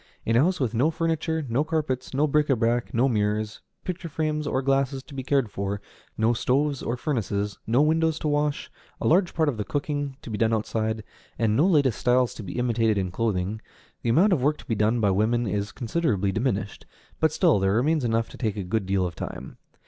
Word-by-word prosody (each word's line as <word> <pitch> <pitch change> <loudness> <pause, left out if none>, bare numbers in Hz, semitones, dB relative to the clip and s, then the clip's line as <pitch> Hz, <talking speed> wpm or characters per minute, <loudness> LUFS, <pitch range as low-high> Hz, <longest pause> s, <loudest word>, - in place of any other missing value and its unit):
In 115 - +1
a - - +6
house 180 +4 +1
with 125 -5 0
no 130 +7 +3
furniture, 160 -1 -1
no 125 +5 +1
carpets, 155 -5 -2
no 140 +3 +2
bric 150 0 +2
à 135 - +2
brac, 115 +1 0
no 120 +3 +2
mirrors, 105 -2 -1 0.2
picture 180 -2 -5
frames 155 -1 -1
or 130 -1 0
glasses 135 0 +1
to 145 - -14
be 135 - -4
cared 130 -4 +1
for, 100 +1 -3 0.4
no 110 +2 +3
stoves 135 +4 0
or 120 - -2
furnaces, 105 -7 -2
no 120 +6 +4
windows 160 +1 +2
to - - -3
wash, 145 0 0 0.3
a - - -4
large 180 +2 +3
part 160 -1 +2
of 135 -6 0
the 105 - -1
cooking 145 +2 -3
to 115 - -7
be 105 - -3
done 115 0 +3
outside, 110 0 -2 0.3
and 110 -2 +1
no 150 +10 +4
latest 140 - +3
styles 125 0 +2
to - - -8
be 95 +2 -6
imitated 115 -3 +1
in 95 -2 -1
clothing, 105 0 -1 0.4
the - - -1
amount 185 - +5
of 150 - +1
work 150 +3 +2
to - - -14
be 120 - -1
done 110 +3 +2
by 105 -3 +3
women 110 +5 +1
is 100 0 -2
considerably 110 - 0
diminished, 105 -2 -2 0.3
but 160 -1 +3
still 160 - +3
there 95 +1 +2
remains 150 +5 +2
enough 115 -1 +1
to - - -13
take 110 -4 -1
a 100 - -2
good 95 +2 -2
deal 95 -1 +1
of 85 - -4
time. - - -7
120 Hz, 220 wpm, -25 LUFS, 110-150 Hz, 0.4 s, a